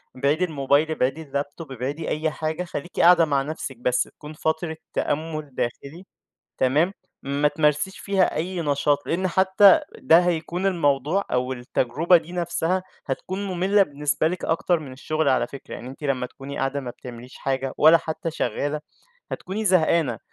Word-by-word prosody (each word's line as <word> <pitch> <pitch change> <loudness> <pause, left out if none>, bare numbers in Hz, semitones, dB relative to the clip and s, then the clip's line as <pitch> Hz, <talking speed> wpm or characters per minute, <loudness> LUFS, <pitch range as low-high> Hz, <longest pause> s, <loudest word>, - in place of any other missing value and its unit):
ابعدي 140 +6 +1
الموبايل، 145 -1 +1
ابعدي 155 +2 -1
الlaptop، 145 +2 -4
ابعدي 135 +5 -4
أي 155 +1 0
حاجة، 155 +3 -3
خليكِ 175 0 -6
قاعدة 170 -1 +7
مع 140 -3 +1
نَفْسك 140 -2 -5
بس، 125 +1 +1
تكُون 150 0 -12
فترة 160 +1 -2 0.2
تأمُل 155 -1 -2
داخلي، 140 +9 -4 0.5
تمام؟ 150 +8 +2 0.3
ما 140 +2 +1
تمارسيش 150 +5 0
فيها 195 -2 +1
أي 175 +3 -2
نشاط، 145 0 +2
لإن 185 +3 0
حتى 190 +2 +6 0.2
ده 165 - +6
هيكُون 175 +2 -1
الموضوع 160 0 +1
أو 125 +1 0
التجربة 130 +7 +2
دي 165 +1 -4
نَفْسها 175 +1 -1 0.2
هتكُون 185 +8 -3
مملة 190 +2 +3
بالنسبة 150 -2 0
لِك 180 +2 -4
أكتر 170 +1 +1
من 145 -4 -9
الشغل 155 +3 -1
على 130 - +2
فكرة، 140 - -9
يعني 120 - -8
أنتِ 135 +3 -11
لمّا 130 -3 0
تكُوني 135 +2 -9
قاعدة 135 +1 -1
ما 125 -3 -6
بتعمليش 125 +1 -11
حاجة 135 -1 -2
ولا 160 +2 +8
حتى 165 +1 -4
شغالة 145 +1 -2 0.5
هتكُوني 205 +4 -4
زهقانة. 165 - +3
155 Hz, 155 wpm, -24 LUFS, 140-175 Hz, 0.5 s, ولا